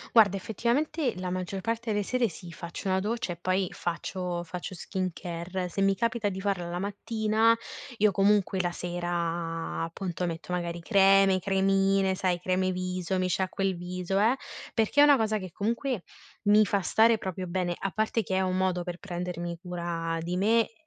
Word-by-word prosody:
Guarda 200 Hz, -4 st, +6 dB
effettivamente 245 Hz, -, 0 dB
la 180 Hz, -1 st, -3 dB
maggior 185 Hz, +1 st, -3 dB
parte 230 Hz, +2 st, -2 dB
delle 205 Hz, -1 st, +1 dB
sere 250 Hz, +1 st, +1 dB
sì, 170 Hz, 0 st, -10 dB
faccio 170 Hz, +3 st, -7 dB
una 190 Hz, 0 st, +2 dB
doccia 215 Hz, -2 st, -2 dB
e -, -, -9 dB
poi 185 Hz, +2 st, 0 dB
faccio 175 Hz, 0 st, -3 dB
faccio 180 Hz, +2 st, -6 dB
skincare. 180 Hz, 0 st, -4 dB
Se 195 Hz, -, -3 dB
mi 195 Hz, 0 st, +4 dB
capita 230 Hz, -2 st, 0 dB
di 190 Hz, -1 st, -5 dB
farla 190 Hz, -3 st, -1 dB
la 175 Hz, -, -3 dB
mattina, 220 Hz, +3 st, +1 dB, 0.4 s
io 210 Hz, -1 st, +4 dB
comunque 195 Hz, -1 st, +3 dB
la 175 Hz, -1 st, -1 dB
sera, 170 Hz, -2 st, -3 dB
appunto, 175 Hz, +1 st, -3 dB
metto 165 Hz, +2 st, -5 dB
magari 170 Hz, -1 st, -2 dB
creme, 195 Hz, -1 st, +5 dB
cremine, 195 Hz, 0 st, +2 dB
sai, 185 Hz, -2 st, 0 dB
creme 185 Hz, +1 st, +1 dB
viso, 185 Hz, 0 st, -2 dB
mi 185 Hz, 0 st, +1 dB
sciacquo 190 Hz, +2 st, -1 dB
il 190 Hz, -1 st, +1 dB
viso, 180 Hz, +2 st, -2 dB
eh 230 Hz, +5 st, +4 dB, 0.4 s
perché 225 Hz, +6 st, +3 dB
è -, -, +10 dB
una 290 Hz, -2 st, +7 dB
cosa 215 Hz, -1 st, +1 dB
che 185 Hz, -2 st, -7 dB
comunque 230 Hz, -, -1 dB, 0.4 s
mi 210 Hz, +1 st, +6 dB
fa 200 Hz, 0 st, +1 dB
stare 225 Hz, +4 st, +4 dB
proprio 185 Hz, -2 st, -4 dB
bene, 175 Hz, 0 st, -1 dB
a 195 Hz, -, -3 dB
parte 220 Hz, +3 st, 0 dB
che 190 Hz, -2 st, -2 dB
è 190 Hz, -, +2 dB
un 185 Hz, 0 st, 0 dB
modo 185 Hz, -1 st, +1 dB
per 175 Hz, 0 st, -6 dB
prendermi 175 Hz, -2 st, -4 dB
cura 170 Hz, -2 st, -3 dB
di 175 Hz, +2 st, -2 dB
me, 220 Hz, +4 st, +4 dB
e -, -, -28 dB
190 Hz, 180 wpm, -28 LUFS, 175-205 Hz, 0.4 s, è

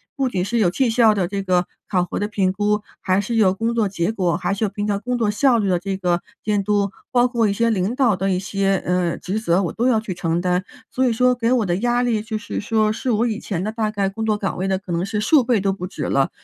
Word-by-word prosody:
不 270 Hz, -3 st, 0 dB
仅 185 Hz, -6 st, -1 dB
是 235 Hz, +4 st, 0 dB
有 195 Hz, -5 st, +4 dB
绩 240 Hz, +6 st, +1 dB
效 225 Hz, -2 st, +4 dB
的 185 Hz, -4 st, 0 dB
这 200 Hz, +2 st, -3 dB
个 180 Hz, -2 st, +1 dB, 0.2 s
考 180 Hz, -3 st, +1 dB
核 -, -, -4 dB
的 205 Hz, -, -1 dB
评 190 Hz, -3 st, 0 dB
估， 210 Hz, +1 st, 0 dB, 0.2 s
还 185 Hz, 0 st, +1 dB
是 205 Hz, +4 st, -3 dB
有 215 Hz, -5 st, +4 dB
工 225 Hz, +5 st, -1 dB
作 220 Hz, -4 st, +1 dB
结 180 Hz, +1 st, -1 dB
果， 180 Hz, -6 st, 0 dB
还 180 Hz, +1 st, -1 dB
是 200 Hz, -, -3 dB
有 210 Hz, -, +1 dB
平 205 Hz, +1 st, -4 dB
常 200 Hz, -1 st, 0 dB
工 250 Hz, +3 st, -2 dB
作 215 Hz, -3 st, +1 dB
效 245 Hz, +3 st, +3 dB
率 205 Hz, -3 st, 0 dB
的 180 Hz, -2 st, +2 dB
这 190 Hz, +1 st, -3 dB
个 175 Hz, -2 st, 0 dB, 0.2 s
监 205 Hz, -1 st, 0 dB
督， 200 Hz, -1 st, +1 dB, 0.2 s
包 245 Hz, -1 st, +4 dB
括 235 Hz, -3 st, +1 dB
一 -, -, +1 dB
些 230 Hz, +3 st, +1 dB
领 200 Hz, +4 st, 0 dB
导 245 Hz, -7 st, +3 dB
的 195 Hz, +1 st, -1 dB
一 185 Hz, -, +1 dB
些， 195 Hz, 0 st, 0 dB
呃， 180 Hz, -1 st, 0 dB
职 195 Hz, +4 st, -3 dB
责， 190 Hz, -3 st, +1 dB
我 175 Hz, -, -3 dB
都 240 Hz, +3 st, 0 dB
要 230 Hz, -4 st, +3 dB
去 215 Hz, -4 st, -5 dB
承 170 Hz, -1 st, -1 dB
担。 180 Hz, +1 st, 0 dB, 0.3 s
所 260 Hz, -, 0 dB
以 -, -, +2 dB
说 250 Hz, +2 st, +3 dB
给 240 Hz, -1 st, 0 dB
我 240 Hz, -5 st, +2 dB
的 175 Hz, -1 st, 0 dB
压 240 Hz, +3 st, +1 dB
力 230 Hz, -3 st, +1 dB
就 220 Hz, 0 st, -4 dB
是 215 Hz, -, -5 dB
说 215 Hz, 0 st, +1 dB
是 255 Hz, +3 st, -4 dB
我 230 Hz, +1 st, +2 dB
以 220 Hz, -2 st, -2 dB
前 185 Hz, -4 st, -3 dB
的 215 Hz, -, -2 dB
大 220 Hz, -1 st, -1 dB
概 200 Hz, -2 st, -1 dB
工 210 Hz, +3 st, -4 dB
作 215 Hz, -1 st, +1 dB
岗 195 Hz, -2 st, -3 dB
位 190 Hz, +2 st, -2 dB
的 190 Hz, -, +1 dB
可 190 Hz, -1 st, -9 dB
能 170 Hz, +1 st, 0 dB
是 205 Hz, +2 st, -2 dB
数 265 Hz, +6 st, +4 dB
倍 235 Hz, -3 st, +2 dB
都 195 Hz, 0 st, 0 dB
不 180 Hz, -1 st, -5 dB
止 -, -, -6 dB
了。 135 Hz, -1 st, +1 dB
205 Hz, 310 characters per minute, -21 LUFS, 185-225 Hz, 0.3 s, 有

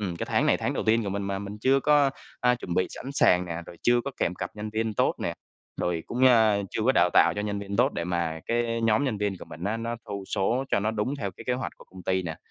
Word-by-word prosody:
ừm, 95 Hz, -5 st, -3 dB
cái -, -, -4 dB
tháng -, -, +2 dB
này -, -, +4 dB
tháng -, -, -2 dB
đầu -, -, -2 dB
tiên 115 Hz, +1 st, +3 dB
của -, -, -2 dB
mình, 100 Hz, +1 st, -2 dB
mà 100 Hz, 0 st, -2 dB
mình 100 Hz, +1 st, -7 dB
chưa 135 Hz, +5 st, +3 dB
có, 145 Hz, -1 st, +4 dB, 0.3 s
a, 125 Hz, -, +4 dB
a, 125 Hz, -, +4 dB
chuẩn 90 Hz, -8 st, -5 dB
bị 90 Hz, -, +2 dB
sẵn 135 Hz, +2 st, -7 dB
sàng 90 Hz, -9 st, +4 dB
nè, 85 Hz, -2 st, -5 dB
rồi 85 Hz, -, -11 dB
chưa 120 Hz, 0 st, +4 dB
có 140 Hz, -, -2 dB
kèm 90 Hz, -, 0 dB
cặp -, -, -5 dB
nhân 105 Hz, 0 st, -5 dB
viên 110 Hz, 0 st, -1 dB
tốt -, -, +2 dB
nè, -, -, -2 dB, 0.5 s
rồi 85 Hz, -2 st, -1 dB
cũng, 125 Hz, +2 st, +1 dB
a, 110 Hz, -4 st, +5 dB
chưa 110 Hz, -, -2 dB
có 130 Hz, -, +5 dB
đào 90 Hz, -, +4 dB
tạo -, -, +5 dB
cho 105 Hz, -, -1 dB
nhân 105 Hz, -1 st, -2 dB
viên 100 Hz, 0 st, -5 dB
tốt 130 Hz, +4 st, +3 dB
để 85 Hz, -, -3 dB
mà 85 Hz, -2 st, -2 dB
cái 115 Hz, 0 st, 0 dB
nhóm 115 Hz, +4 st, +2 dB
nhân 110 Hz, -6 st, -1 dB
viên 105 Hz, -2 st, -1 dB
của -, -, -9 dB
mình 85 Hz, -, -9 dB
á, 105 Hz, +3 st, 0 dB
nó 115 Hz, +1 st, -3 dB
thu 100 Hz, -1 st, -5 dB
số 115 Hz, +7 st, +1 dB
cho -, -, +2 dB
nó 110 Hz, +2 st, 0 dB
đúng 110 Hz, +5 st, -1 dB
theo 100 Hz, -8 st, -3 dB
cái 115 Hz, -, -12 dB
kế 125 Hz, -, +1 dB
hoạch 125 Hz, +1 st, -3 dB
của -, -, -15 dB
công 95 Hz, 0 st, -13 dB
ty 95 Hz, +1 st, 0 dB
nè. 80 Hz, -3 st, -5 dB
105 Hz, 300 wpm, -27 LUFS, 95-120 Hz, 0.5 s, a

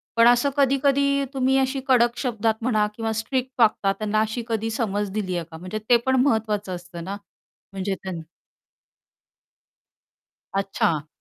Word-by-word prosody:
पण 230 Hz, +1 st, +6 dB
असं 245 Hz, +3 st, +4 dB
कधी-कधी 280 Hz, 0 st, +3 dB
तुम्ही 265 Hz, 0 st, +2 dB
अशी 265 Hz, +1 st, +1 dB
कडक 240 Hz, -2 st, +3 dB
शब्दात 225 Hz, -4 st, 0 dB
म्हणा, 215 Hz, -3 st, +2 dB
किंवा 225 Hz, -1 st, -2 dB
स्ट्रिक्ट 260 Hz, +2 st, -2 dB
वागता, 210 Hz, -3 st, +3 dB
त्यांना 215 Hz, +1 st, 0 dB
अशी 220 Hz, +2 st, -2 dB
कधी 225 Hz, -1 st, -1 dB
समज 205 Hz, -2 st, -1 dB
दिली 190 Hz, -3 st, -2 dB
आहे 165 Hz, -, -4 dB
का? 160 Hz, -, -8 dB
म्हणजे 185 Hz, +5 st, -5 dB
ते 240 Hz, -, +7 dB
पण 260 Hz, 0 st, +3 dB
महत्वाचं 210 Hz, -7 st, 0 dB
असतं 175 Hz, -1 st, -9 dB
ना, 195 Hz, +3 st, -5 dB, 0.6 s
म्हणजे 195 Hz, 0 st, -2 dB
त्यांन 180 Hz, -3 st, -5 dB, 2.3 s
अच्छा. 170 Hz, -6 st, 0 dB
220 Hz, 145 wpm, -24 LUFS, 195-255 Hz, 2.3 s, ते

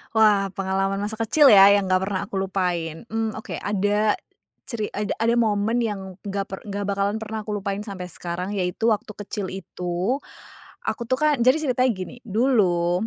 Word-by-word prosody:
Wah, 205 Hz, -3 st, +4 dB
pengalaman 195 Hz, 0 st, 0 dB
masa 210 Hz, -, -4 dB
kecil 270 Hz, +2 st, +6 dB
ya 195 Hz, 0 st, +9 dB
yang 200 Hz, -1 st, +4 dB
nggak 185 Hz, 0 st, +2 dB
pernah 190 Hz, -1 st, -1 dB
aku 190 Hz, -1 st, -3 dB
lupain. 180 Hz, -3 st, -2 dB
Mmm, 225 Hz, -1 st, -2 dB
oke 220 Hz, -, -7 dB
ada 205 Hz, +1 st, +1 dB, 0.5 s
ceri 220 Hz, -4 st, -3 dB
ada 210 Hz, 0 st, -2 dB
ada 230 Hz, +1 st, +3 dB
momen 220 Hz, 0 st, +2 dB
yang 195 Hz, -4 st, -4 dB
nggak 200 Hz, 0 st, -2 dB
per 190 Hz, -, -5 dB
nggak 205 Hz, 0 st, -3 dB
bakalan 200 Hz, +2 st, 0 dB
pernah 220 Hz, -1 st, -5 dB
aku 210 Hz, -, -3 dB
lupain 200 Hz, 0 st, -2 dB
sampai 185 Hz, -4 st, -6 dB
sekarang 175 Hz, +2 st, -4 dB
yaitu 185 Hz, +5 st, 0 dB
waktu 215 Hz, -1 st, -1 dB
kecil 205 Hz, -1 st, -5 dB
itu, 180 Hz, +5 st, -2 dB, 0.7 s
aku -, -, -3 dB
tuh 255 Hz, -, +1 dB
kan 300 Hz, -2 st, +2 dB
jadi 255 Hz, +6 st, +4 dB
ceritanya 255 Hz, 0 st, +3 dB
gini 185 Hz, +4 st, -7 dB
dulu, 195 Hz, -5 st, +2 dB
200 Hz, 175 wpm, -24 LUFS, 190-220 Hz, 0.7 s, ya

